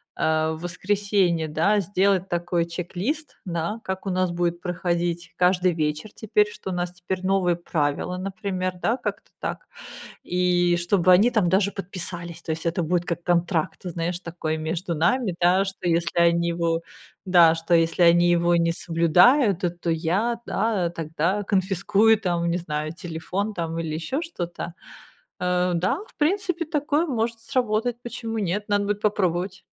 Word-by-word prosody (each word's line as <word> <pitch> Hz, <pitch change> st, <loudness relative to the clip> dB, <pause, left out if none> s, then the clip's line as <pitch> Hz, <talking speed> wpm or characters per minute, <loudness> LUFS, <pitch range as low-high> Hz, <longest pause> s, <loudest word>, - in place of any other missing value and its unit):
а 160 Hz, 0 st, +1 dB
в 160 Hz, -, -8 dB
воскресенье, 185 Hz, -2 st, 0 dB
да, 170 Hz, +7 st, +2 dB
сделать 195 Hz, 0 st, +1 dB
такой 175 Hz, 0 st, 0 dB
чек-лист, 185 Hz, -, -4 dB
да, 170 Hz, +5 st, -3 dB
как 190 Hz, +1 st, -4 dB
у 195 Hz, -, -1 dB
нас 185 Hz, 0 st, +1 dB
будет 175 Hz, 0 st, -1 dB
проходить 175 Hz, -1 st, -2 dB
каждый 180 Hz, 0 st, +3 dB
вечер 155 Hz, +5 st, -2 dB
теперь, 210 Hz, -1 st, +2 dB
что 200 Hz, -, -8 dB
у 185 Hz, -, -2 dB
нас 175 Hz, 0 st, -2 dB
теперь 180 Hz, +1 st, -5 dB
новые 185 Hz, -2 st, +2 dB
правила, 165 Hz, +1 st, -2 dB
например, 185 Hz, -1 st, -3 dB
да, 230 Hz, +6 st, +1 dB
как-то 245 Hz, -, -5 dB
так, -, -, -4 dB, 0.6 s
и 175 Hz, -1 st, +2 dB
чтобы 180 Hz, +1 st, +3 dB
они 205 Hz, +7 st, +6 dB
там 210 Hz, -8 st, +2 dB
даже 200 Hz, +2 st, +2 dB
подписались. 175 Hz, -3 st, -5 dB
То 160 Hz, -, -3 dB
есть, 160 Hz, +1 st, -5 dB
это 170 Hz, +1 st, 0 dB
будет 175 Hz, +2 st, 0 dB
как 170 Hz, -1 st, -3 dB
контракт, 175 Hz, +1 st, 0 dB
знаешь, 175 Hz, 0 st, -3 dB
такой 165 Hz, -2 st, -3 dB
между 165 Hz, +3 st, -3 dB
нами, 180 Hz, +5 st, +1 dB
да, 185 Hz, +3 st, +4 dB
что 190 Hz, -2 st, -6 dB
если 170 Hz, 0 st, +1 dB
они 170 Hz, 0 st, +3 dB
его 170 Hz, -1 st, 0 dB, 0.5 s
да, 170 Hz, -3 st, +6 dB
что 165 Hz, +1 st, 0 dB
если 165 Hz, +1 st, +2 dB
они 175 Hz, 0 st, +6 dB
его 175 Hz, 0 st, +3 dB
не 170 Hz, 0 st, +2 dB
соблюдают, 180 Hz, -, +4 dB
то 180 Hz, -, +1 dB
то 175 Hz, -1 st, -4 dB
я, 190 Hz, +9 st, 0 dB
да 210 Hz, -6 st, 0 dB
тогда 165 Hz, +4 st, -1 dB
конфискую, 200 Hz, +3 st, +2 dB
там, 175 Hz, -4 st, -1 dB
не 170 Hz, -, +1 dB
знаю, 155 Hz, -2 st, -3 dB
телефон 180 Hz, +5 st, -4 dB
там 165 Hz, -1 st, -3 dB
или 160 Hz, -2 st, -3 dB
ещё 165 Hz, -, -2 dB
что-то. 175 Hz, -, -5 dB, 0.7 s
Э, 180 Hz, 0 st, +1 dB
да, 185 Hz, -, +1 dB
в -, -, -21 dB
принципе, 350 Hz, +1 st, 0 dB
такое 300 Hz, +1 st, 0 dB
может 230 Hz, -4 st, -2 dB
сработать. 240 Hz, -2 st, 0 dB
Почему 230 Hz, -2 st, -5 dB
нет? 205 Hz, +1 st, -2 dB
Надо 205 Hz, 0 st, +2 dB
будет 205 Hz, 0 st, -2 dB
попробовать. 190 Hz, -2 st, 0 dB
180 Hz, 160 wpm, -24 LUFS, 170-200 Hz, 0.7 s, они